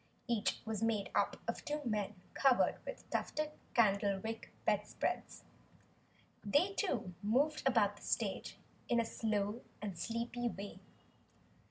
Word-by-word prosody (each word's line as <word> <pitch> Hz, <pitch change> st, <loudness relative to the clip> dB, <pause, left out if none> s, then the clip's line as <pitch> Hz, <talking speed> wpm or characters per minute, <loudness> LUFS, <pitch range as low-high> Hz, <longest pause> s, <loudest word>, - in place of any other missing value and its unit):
Each 230 Hz, -3 st, +1 dB
was 220 Hz, -2 st, -2 dB
made 225 Hz, -3 st, +1 dB
up -, -, +2 dB
of -, -, -2 dB
two 295 Hz, 0 st, -2 dB
men 210 Hz, -3 st, 0 dB, 0.2 s
covered 270 Hz, -3 st, +4 dB
with -, -, -6 dB
tufted 305 Hz, 0 st, 0 dB, 0.2 s
candlewick 205 Hz, 0 st, +2 dB, 0.2 s
bedspreads. -, -, 0 dB, 1.0 s
They 290 Hz, -, +3 dB
too 235 Hz, -, -1 dB
moved 270 Hz, +9 st, +2 dB
about 205 Hz, -5 st, +4 dB
the -, -, -15 dB
stage -, -, -1 dB, 0.3 s
in 240 Hz, -, +4 dB
a 230 Hz, -, +2 dB
slow 215 Hz, 0 st, 0 dB, 0.2 s
and 205 Hz, -3 st, -4 dB
sleepy 235 Hz, +3 st, -1 dB
way. 200 Hz, -1 st, -7 dB
225 Hz, 125 wpm, -36 LUFS, 205-245 Hz, 1.0 s, covered